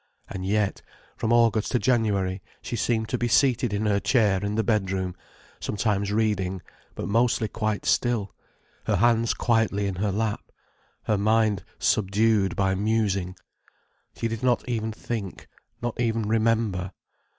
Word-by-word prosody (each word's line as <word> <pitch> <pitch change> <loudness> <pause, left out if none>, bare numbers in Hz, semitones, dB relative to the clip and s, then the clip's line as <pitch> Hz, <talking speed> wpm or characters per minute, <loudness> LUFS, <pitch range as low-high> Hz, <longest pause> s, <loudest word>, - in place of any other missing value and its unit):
And 95 -2 -6
yet, 100 +1 0 0.3
from 110 - -1
August 115 -2 +3
to - - +4
January, 100 -5 +1 0.2
she - - -4
seemed 110 0 0
to 125 - -1
be 120 - +1
seated 120 -1 +3
in 105 +1 -1
her 100 -1 +2
chair 105 -5 +2
in 100 +1 -1
the 110 - +1
bedroom, 95 -4 0 0.5
sometimes 100 -1 -1
reading, 95 -4 0 0.3
but - - -4
mostly 115 +1 +2
quite 110 -1 -2
still, 115 -5 +1 0.5
her 110 - +1
hands 115 +3 +3
quietly 110 -3 +1
in 95 -2 -3
her 100 +1 0
lap, 110 +1 -2 0.5
her 105 -2 0
mind 110 -1 +2
subdued 105 -1 +2
by 95 -1 +1
musing. 100 -3 0 0.8
She 115 - -2
did 115 -1 -4
not 125 -1 +1
even 110 -2 -2
think, 110 -3 -6 0.4
not 120 0 -2
even 115 -1 0
remember. 110 -4 +1
110 Hz, 145 wpm, -25 LUFS, 100-115 Hz, 0.8 s, to